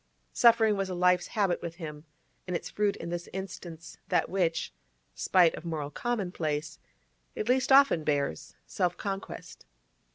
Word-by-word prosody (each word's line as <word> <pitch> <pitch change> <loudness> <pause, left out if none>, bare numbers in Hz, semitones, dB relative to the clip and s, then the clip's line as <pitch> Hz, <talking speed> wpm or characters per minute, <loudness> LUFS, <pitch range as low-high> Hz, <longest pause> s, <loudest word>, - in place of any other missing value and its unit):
Suffering 225 -3 +5
was 195 -1 -2
a 185 - -3
life's 180 0 +3
habit 195 -5 0
with 165 -1 -6
him, 155 -3 -8 0.4
and 180 - -2
its - - -4
fruit 205 -1 +1
in 170 - -7
this 175 0 -4
instance 175 -4 -8
that - - +2
which 170 - 0 0.4
(spite 175 -3 +4
of 155 - -8
moral 155 -4 -4
commonplace) 160 -10 -2 0.6
it 215 - -3
least 255 +2 +2
often 270 - +6
bears—self 150 - -2
conquest. 195 -1 -6
180 Hz, 140 wpm, -29 LUFS, 165-200 Hz, 0.6 s, often